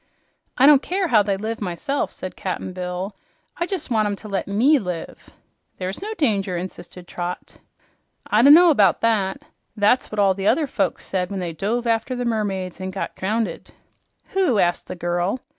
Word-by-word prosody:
"I 260 Hz, -, +5 dB
don't 285 Hz, -1 st, +7 dB
care 370 Hz, +1 st, -1 dB
how 220 Hz, -5 st, +5 dB
they 200 Hz, -1 st, 0 dB
live, 220 Hz, +3 st, -4 dB
myself," 200 Hz, +10 st, -2 dB
said 185 Hz, -, -7 dB
Cap'n 185 Hz, -1 st, -4 dB
Bill. 180 Hz, +2 st, -4 dB, 0.4 s
"I 345 Hz, -, 0 dB
jes' 385 Hz, -9 st, -4 dB
want 215 Hz, -2 st, +2 dB
'em 205 Hz, -, -2 dB
to 215 Hz, -, -11 dB
let 200 Hz, -2 st, -2 dB
ME 250 Hz, +9 st, +4 dB
live." 180 Hz, -6 st, -6 dB, 0.5 s
"There's 185 Hz, +1 st, -4 dB
no 420 Hz, +2 st, -4 dB
danger," 200 Hz, -, 0 dB
insisted 175 Hz, 0 st, -8 dB
Trot. 175 Hz, 0 st, -6 dB, 0.7 s
"I 215 Hz, -, +3 dB
do' 275 Hz, -, +7 dB
know 335 Hz, +2 st, +8 dB
'bout 210 Hz, -7 st, +3 dB
that. 210 Hz, -4 st, +1 dB, 0.3 s
That's 210 Hz, +5 st, +2 dB
what 215 Hz, -, -6 dB
all 200 Hz, -2 st, +4 dB
the 195 Hz, +1 st, -3 dB
other 315 Hz, -, +3 dB
folks 200 Hz, -9 st, -2 dB
said 185 Hz, -1 st, -2 dB
when 200 Hz, -1 st, -4 dB
they 175 Hz, -2 st, -4 dB
dove 225 Hz, +8 st, -2 dB
after 230 Hz, +2 st, 0 dB
the 245 Hz, 0 st, -3 dB
mermaids 195 Hz, -5 st, -2 dB
an' 185 Hz, -, -3 dB
got 190 Hz, +1 st, -5 dB
drownded." 215 Hz, +4 st, -3 dB, 0.6 s
"Who?" 370 Hz, -, +1 dB
asked 175 Hz, -3 st, +1 dB
the 185 Hz, -, -6 dB
girl. 175 Hz, +6 st, -1 dB
205 Hz, 185 wpm, -22 LUFS, 185-240 Hz, 0.7 s, know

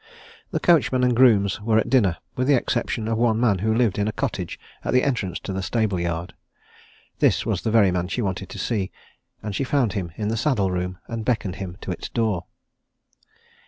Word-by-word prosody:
The -, -, -1 dB
coachman 135 Hz, -7 st, +3 dB
and 125 Hz, -1 st, +3 dB
grooms 110 Hz, -5 st, +4 dB
were 110 Hz, +1 st, +2 dB
at 110 Hz, -, +2 dB
dinner 100 Hz, -10 st, +3 dB, 0.2 s
with 130 Hz, +1 st, 0 dB
the 145 Hz, -, +5 dB
exception 120 Hz, -2 st, -1 dB
of 115 Hz, 0 st, 0 dB
one 115 Hz, -2 st, +2 dB
man 110 Hz, -6 st, +2 dB
who 110 Hz, +3 st, +1 dB
lived 110 Hz, -3 st, +2 dB
in 100 Hz, -, +1 dB
a -, -, 0 dB
cottage 105 Hz, -, -3 dB, 0.2 s
at -, -, -1 dB
the 125 Hz, -, +4 dB
entrance 115 Hz, -10 st, -1 dB
to 95 Hz, -, -5 dB
the 95 Hz, -, -2 dB
stable 105 Hz, -2 st, 0 dB
yard. 85 Hz, 0 st, -3 dB, 0.9 s
This -, -, +3 dB
was -, -, -1 dB
the -, -, -1 dB
very 110 Hz, -4 st, +5 dB
man 90 Hz, 0 st, -1 dB
she 120 Hz, +6 st, -2 dB
wanted 95 Hz, -1 st, -3 dB
to -, -, -8 dB
see, 100 Hz, -5 st, -1 dB, 0.5 s
and 105 Hz, -1 st, -4 dB
she -, -, 0 dB
found 130 Hz, -6 st, +1 dB
him 90 Hz, -4 st, -3 dB
in 105 Hz, +2 st, -2 dB
the 115 Hz, -, -1 dB
saddle 110 Hz, -7 st, +1 dB
room, 90 Hz, 0 st, -2 dB
and 115 Hz, -1 st, -4 dB
beckoned 105 Hz, -5 st, -1 dB
him 95 Hz, -3 st, -6 dB
to -, -, -4 dB
its 90 Hz, -, -5 dB
door. 110 Hz, -7 st, -1 dB
110 Hz, 210 wpm, -23 LUFS, 95-120 Hz, 0.9 s, the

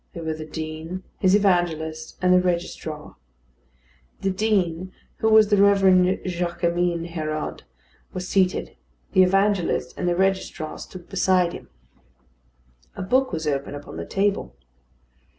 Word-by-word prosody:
They 170 Hz, -, -7 dB
were 160 Hz, -1 st, -2 dB
the 155 Hz, 0 st, -7 dB
Dean, 160 Hz, +4 st, -6 dB, 0.2 s
his 185 Hz, 0 st, +4 dB
evangelist, 165 Hz, -5 st, 0 dB
and 180 Hz, 0 st, +5 dB
the 180 Hz, -, +5 dB
registrar. 170 Hz, -4 st, -3 dB, 1.0 s
The 195 Hz, -, +1 dB
Dean, 185 Hz, -3 st, 0 dB, 0.3 s
who 220 Hz, -, +1 dB
was 220 Hz, -1 st, +6 dB
the 205 Hz, -2 st, +4 dB
Reverend 190 Hz, -2 st, +4 dB
Jaquemin 175 Hz, -1 st, -1 dB
Hérode, 155 Hz, -2 st, -4 dB, 0.5 s
was 185 Hz, 0 st, -5 dB
seated; 185 Hz, -1 st, +1 dB, 0.4 s
the 185 Hz, -, +5 dB
evangelist 195 Hz, -7 st, +2 dB
and 180 Hz, -, 0 dB
the 175 Hz, -, +1 dB
registrar 190 Hz, -4 st, -1 dB
stood 180 Hz, -2 st, -10 dB
beside 185 Hz, -2 st, +2 dB
him. -, -, -10 dB, 1.3 s
A -, -, -4 dB
book 260 Hz, +7 st, +2 dB
was 160 Hz, -3 st, -3 dB
open 140 Hz, -1 st, -2 dB
upon 145 Hz, 0 st, -9 dB
the -, -, -5 dB
table. 200 Hz, 0 st, -1 dB
180 Hz, 135 wpm, -24 LUFS, 160-195 Hz, 1.3 s, was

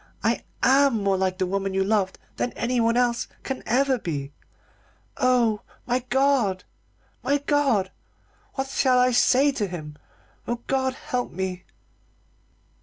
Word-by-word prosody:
I -, -, +1 dB, 0.2 s
am 270 Hz, -5 st, +4 dB
more 195 Hz, -1 st, +2 dB
like 185 Hz, -1 st, 0 dB
the 190 Hz, -, 0 dB
woman 195 Hz, +1 st, -2 dB
you 195 Hz, -, +2 dB
loved 195 Hz, -2 st, 0 dB, 0.2 s
than 245 Hz, -, -1 dB
anyone 235 Hz, -1 st, +1 dB
else 240 Hz, -1 st, +1 dB, 0.2 s
can 265 Hz, -1 st, -4 dB
ever 260 Hz, +2 st, +2 dB
be. 145 Hz, -7 st, -4 dB, 0.8 s
Oh, 240 Hz, -4 st, +2 dB, 0.2 s
my 250 Hz, +1 st, +1 dB
God! 260 Hz, -8 st, +2 dB, 0.6 s
my 285 Hz, -, +2 dB
God! 275 Hz, -10 st, +1 dB, 0.6 s
what 270 Hz, -1 st, -2 dB
shall 265 Hz, -1 st, +2 dB
I 250 Hz, 0 st, +4 dB
say 260 Hz, +3 st, +4 dB
to 215 Hz, -6 st, -2 dB
him? 155 Hz, -5 st, -7 dB, 0.5 s
Oh, 240 Hz, 0 st, -2 dB
God 260 Hz, -1 st, 0 dB
help 250 Hz, -1 st, -3 dB
me!" 185 Hz, 0 st, -4 dB
240 Hz, 135 wpm, -25 LUFS, 190-260 Hz, 0.8 s, am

